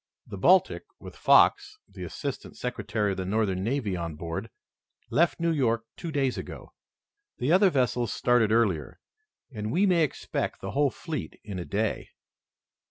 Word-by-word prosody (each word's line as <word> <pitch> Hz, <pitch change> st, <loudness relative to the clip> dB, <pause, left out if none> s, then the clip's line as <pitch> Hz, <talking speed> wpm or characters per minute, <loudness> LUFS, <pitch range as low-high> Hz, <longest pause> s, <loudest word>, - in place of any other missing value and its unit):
The -, -, -8 dB
Baltic, -, -, +4 dB
with -, -, -11 dB
Fox, 425 Hz, -, +4 dB
the -, -, -10 dB
assistant -, -, -6 dB
secretary 105 Hz, -4 st, -2 dB
of 95 Hz, -, -4 dB
the 95 Hz, -, -2 dB
Northern 95 Hz, -3 st, 0 dB
Navy, 115 Hz, -4 st, -1 dB
on 85 Hz, -3 st, -4 dB
board, 85 Hz, +7 st, -5 dB, 0.6 s
left 170 Hz, +3 st, +2 dB
New 170 Hz, 0 st, +1 dB
York 115 Hz, -7 st, +1 dB
two 165 Hz, -, -6 dB
days 135 Hz, -4 st, 0 dB
ago. -, -, -9 dB, 0.6 s
The 130 Hz, +5 st, 0 dB
other 190 Hz, +2 st, +6 dB
vessels 125 Hz, -, 0 dB
started 120 Hz, -3 st, +2 dB
earlier, 105 Hz, -9 st, +1 dB, 0.5 s
and 105 Hz, -3 st, -4 dB
we 190 Hz, +9 st, +3 dB
may 175 Hz, -4 st, +4 dB
expect 150 Hz, -, -3 dB
the -, -, -5 dB
whole 145 Hz, 0 st, +2 dB
fleet 155 Hz, +1 st, -6 dB
in 100 Hz, -4 st, -6 dB
a 85 Hz, -, -5 dB
day." 105 Hz, +1 st, -2 dB
115 Hz, 160 wpm, -27 LUFS, 100-145 Hz, 0.6 s, other